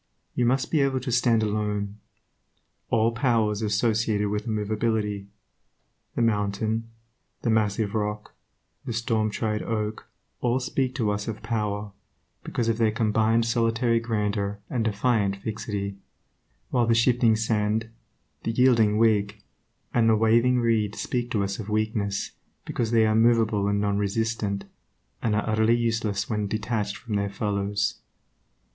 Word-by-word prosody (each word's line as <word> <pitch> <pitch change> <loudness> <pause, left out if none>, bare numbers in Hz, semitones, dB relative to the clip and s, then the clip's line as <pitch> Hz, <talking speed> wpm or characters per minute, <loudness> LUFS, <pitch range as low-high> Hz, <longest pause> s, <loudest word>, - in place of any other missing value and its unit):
You 120 - +1
must 130 +2 +1
be 155 - +3
able 135 -1 +1
to 130 0 -4
stand 120 -2 +3
alone. 105 -1 -2 0.9
All 115 0 +3
power 115 -2 +2
is 105 +1 -4
associated 105 -1 +1
with 105 +2 -3
immovability. 105 -1 -1 0.9
The 120 - +1
mountain, 110 +1 0 0.5
the 115 - +2
massive 105 -1 +1
rock, 105 -1 -3 0.5
the 120 - -4
storm 110 -1 0
tried 105 0 -2
oak, 110 -1 -3 0.3
all 120 +1 +1
speak 130 0 -1
to 110 -3 +1
us 105 0 -3
of 110 -1 -5
power, 105 -2 -2 0.5
because 120 - -2
of 115 0 0
their 115 -1 +4
combined 110 +1 +2
solitary 115 0 +2
grandeur 105 -3 -1
and 120 -3 0
defiant 105 -2 +1
fixity; 100 -1 -4 0.7
while 120 -2 +2
the 115 - +4
shifting 115 -1 +4
sand, 110 0 0 0.5
the - - -3
yielding 115 -3 +4
twig, 105 -2 +2 0.5
and 115 -2 +4
the 110 - +5
waving 115 +3 +3
reed 110 -3 +1
speak 120 -1 -2
to 105 -4 0
us 100 +1 -3
of 110 -1 -6
weakness, 105 -2 -1 0.3
because 115 -2 -2
they 115 -1 +4
are 110 - +2
movable 110 -3 +3
and 100 0 +1
non 100 0 0
resistant, 105 -1 -1 0.6
and 110 -2 +1
are 105 - -1
utterly 110 +1 +3
useless 110 -3 -1
when 105 -2 -1
detached 105 -1 -2
from 110 -4 -3
their 100 0 -1
fellows. 100 0 -1
110 Hz, 145 wpm, -26 LUFS, 105-115 Hz, 0.9 s, the